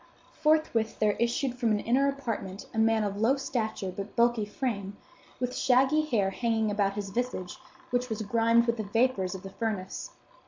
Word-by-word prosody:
Forthwith 305 -8 +1
there 215 -1 +3
issued 240 +2 +1
from 235 -3 +2
an 210 -1 +2
inner 265 +6 +2
apartment 230 -8 -4
a 220 - -1
man 225 -1 +3
of 200 -1 -2
low 245 +5 +4
stature, 220 -8 -3
but 200 +1 -6
bulky 235 -2 +3
frame, 205 -3 -3 0.4
with 250 0 -2
shaggy 265 +4 +4
hair 205 -9 +1
hanging 220 0 0
about 200 -1 +1
his 200 -2 -4
visage, 245 -1 -3 0.3
which 250 0 0
was 220 -1 -3
grimed 230 +2 +3
with 235 0 0
the 215 - -2
vapors 205 -3 +1
of 185 - -8
the 195 - -8
furnace. 210 -4 -3
225 Hz, 180 wpm, -29 LUFS, 205-250 Hz, 0.4 s, low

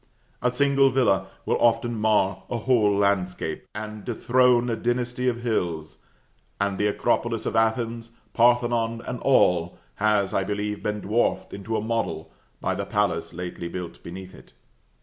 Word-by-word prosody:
A 125 - +2
single 140 +1 +3
villa 100 -8 +2 0.2
will - - +1
often 120 0 +3
mar 105 -3 +2
a 120 - -1
whole 110 -4 +2
landscape, 95 -5 -1
and 105 0 -6
dethrone 125 0 +3
a - - 0
dynasty 120 +1 -1
of 120 -1 0
hills, 85 -9 -2 0.6
and 100 -1 -1
the 105 - +2
Acropolis 115 +2 0
of - - -2
Athens, 115 +1 0 0.2
Parthenon 120 -1 +2
and 125 -1 -4
all, 90 -11 +3 0.2
has, 105 -2 +2
I 95 - +1
believe, 105 +1 -3
been 105 0 -2
dwarfed 110 +4 0
into 110 +3 -3
a - - -1
model 110 -8 -2 0.3
by - - -1
the - - -3
palace - - -1
lately 90 0 -6
built 90 -1 -7
beneath 95 +2 -9
it. - - -16
110 Hz, 150 wpm, -25 LUFS, 100-120 Hz, 0.6 s, single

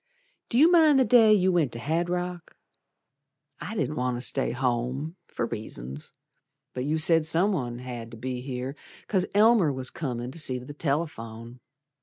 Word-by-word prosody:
Do 235 - 0
you 315 +6 +6
mind 315 -5 +6
the 260 - +4
day 230 -4 +6
you 190 -3 +4
went 165 -8 +1
to 115 - -5
Hadrock? 175 +5 -3 1.0
I 180 +6 -6
didn't 150 - -2
want 125 -1 -1
to - - -6
stay - - +1
home 125 +5 -2
for 120 - -3
reasons, 70 - -7 0.6
But 125 0 -3
you 155 +2 0
said 165 0 +3
someone 160 -7 0
'd - - -9
have 120 -2 -7
to 115 - -11
be 125 +2 -4
here 130 0 -5 0.3
'Cause 185 -3 +1
Elmer 210 -6 +5
was 130 -1 -4
comin' 125 -5 -4
to 165 - -6
see 130 -4 0
t' 125 - -11
th' 145 +2 -11
telephone. 120 -6 -3
145 Hz, 175 wpm, -26 LUFS, 125-180 Hz, 1.0 s, you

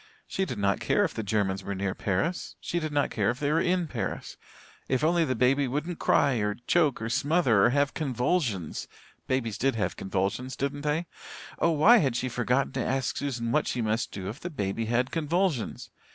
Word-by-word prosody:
She 190 - -1
did 125 - -5
not 100 -1 +1
care 205 - +2
if 175 - -1
the 110 - -3
Germans 100 -2 -1
were 100 +1 -4
near 95 0 -1
Paris 100 - -2
she 175 - -2
did 155 -2 -3
not 145 -1 +1
care 100 -3 +1
if 120 +2 -2
they 145 0 0
were 165 +2 +3
in 180 0 +1
Paris 130 -7 -4 0.5
if 130 +1 +1
only 170 +2 +3
the 130 -3 -1
baby 130 +4 +3
wouldn't 150 +6 -3
cry 140 -3 +3
or 105 -1 0
choke 155 -6 +3
or 115 - -3
smother 140 - +3
or - - +5
have 145 +2 +1
convulsions. 125 - -1 0.4
Babies 115 -5 -1
did 135 -1 +1
have 110 - -1
convulsions, 100 +7 -2
didn't 140 +1 -2
they? 150 +3 0 0.5
Oh, - - +3
why 170 +10 +6
had 135 - +1
she 130 +1 -1
forgotten 125 +2 0
to 130 - -2
ask 135 -1 -1
Susan 120 -5 -2
what 150 +3 +2
she 120 - -1
must 110 +2 -1
do 95 -1 -6
if 110 +8 -6
the 175 - -5
baby 115 - -2
had 120 +3 0
convulsions? 165 - -1
130 Hz, 205 wpm, -28 LUFS, 110-150 Hz, 0.5 s, why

